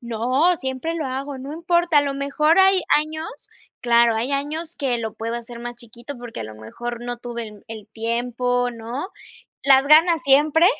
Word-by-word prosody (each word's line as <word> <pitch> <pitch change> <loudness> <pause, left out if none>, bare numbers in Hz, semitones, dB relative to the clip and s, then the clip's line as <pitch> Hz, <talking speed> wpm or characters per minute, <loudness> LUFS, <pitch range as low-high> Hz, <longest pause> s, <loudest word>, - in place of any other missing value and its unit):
No, 255 +9 +1
siempre 265 +5 -4
lo 315 -4 -3
hago, 270 +1 -4
no 270 +3 -7
importa, 340 -1 +2
a - - +4
lo 280 -1 -2
mejor 280 +4 +2
hay 380 0 +5 0.2
años 315 +8 -6 0.3
claro, 235 -1 +4
hay 240 +5 -1
años 310 +4 -3
que 255 -4 -1
lo 220 -2 -5
puedo 230 +1 -4
hacer 235 0 -9
más 240 0 -6
chiquito, 235 +4 -9
porque, 240 -1 -8
a - - -2
lo 110 0 -9
mejor, 240 - -7
no 245 0 -4
tuve 235 -1 -5
el 210 -1 -15
el 220 -2 -8
tiempo, 245 +2 -1
¿no?. 235 +8 -6 0.5
Las 270 0 +5
ganas 325 +2 +6
siempre, 295 +4 +4
260 Hz, 185 wpm, -22 LUFS, 235-305 Hz, 0.5 s, ganas